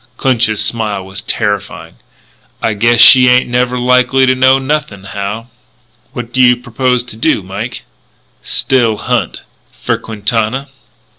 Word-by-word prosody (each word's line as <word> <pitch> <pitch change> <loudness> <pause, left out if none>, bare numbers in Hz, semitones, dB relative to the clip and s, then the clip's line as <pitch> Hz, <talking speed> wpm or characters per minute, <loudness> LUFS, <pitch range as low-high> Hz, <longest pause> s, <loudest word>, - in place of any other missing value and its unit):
Clinch's 115 -5 +1
smile 105 -4 -2
was 95 +1 -7
terrifying. 105 -1 -4 0.6
"I 110 - -1
guess 115 +3 +2
she 125 +2 +8
ain't 125 +1 +3
never 125 +1 -1
likely 125 +1 +2
to 130 - +3
know 130 +1 +3
nothing, 135 -7 -3
Hal." 105 +4 -6 0.6
"What 120 -1 -7
do 130 - +2
you 125 -1 +5
purpose 125 +1 -1
to 120 -3 -11
do, 110 - 0
Mike?" - - -7 0.6
"Still 120 -5 0
hunt." - - -2 0.4
"For - - -2
Quintana?" 115 +5 -2
120 Hz, 135 wpm, -13 LUFS, 110-125 Hz, 0.6 s, she